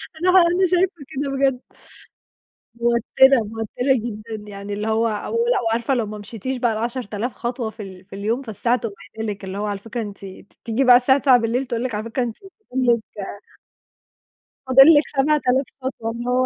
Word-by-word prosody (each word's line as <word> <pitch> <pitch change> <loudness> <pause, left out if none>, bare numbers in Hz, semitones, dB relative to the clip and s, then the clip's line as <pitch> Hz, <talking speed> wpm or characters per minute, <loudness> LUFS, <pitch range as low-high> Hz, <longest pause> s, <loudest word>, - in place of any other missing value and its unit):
أنا 355 +3 0
ها 375 -1 +7
أنا 365 +2 +2
شايفة 355 -4 0
كده 280 +1 -2
بجد. 270 -2 +1 1.1
موتِّرة، 235 +3 +4
موتِّرة 225 +5 -1
جدًا، 215 -2 -6
يعني 200 +1 -7
اللي 210 +2 -3
هو 225 +1 +2
أو 210 -2 -4
ولأ 480 - +1
وعارفه 230 +3 0
لو 235 -4 0
ما 210 +1 -7
مشيتيش 230 +5 -5
بقى 240 -2 +1
ال10.000 235 0 -3
خطوة 240 -1 -4
في 220 -1 -9
ال 190 -1 -11
في 195 - -11
اليوم 220 +6 -1
فالساعة 235 +1 -1
تقوم 220 -3 -5 0.2
قايلة 220 -2 -2
لِك، 200 - -16
اللي 190 +1 -6
هو 210 - -2
على 205 -1 -3
فكرة 230 +3 -5
أنتِ 205 -2 -8
أنتِ 190 +1 -11
بتيجي 235 +3 -2
بقى 250 -1 +8
الساعة 265 +2 +3
21:00 250 -1 +3
تقول 240 -1 -3
لِك 240 -5 -3
على 210 - -3
فكرة 230 +2 -2
أنتِ 230 -2 -5 0.3
فاضِل 255 0 0
لِك - - -11 1.7
فاضل 265 +1 +8
لِك 295 - +2
7.000 270 -2 +2 0.2
خطوة، 235 -3 -4
اللي 240 +2 -5
هو 255 +1 +2
235 Hz, 190 wpm, -21 LUFS, 215-260 Hz, 1.7 s, بقى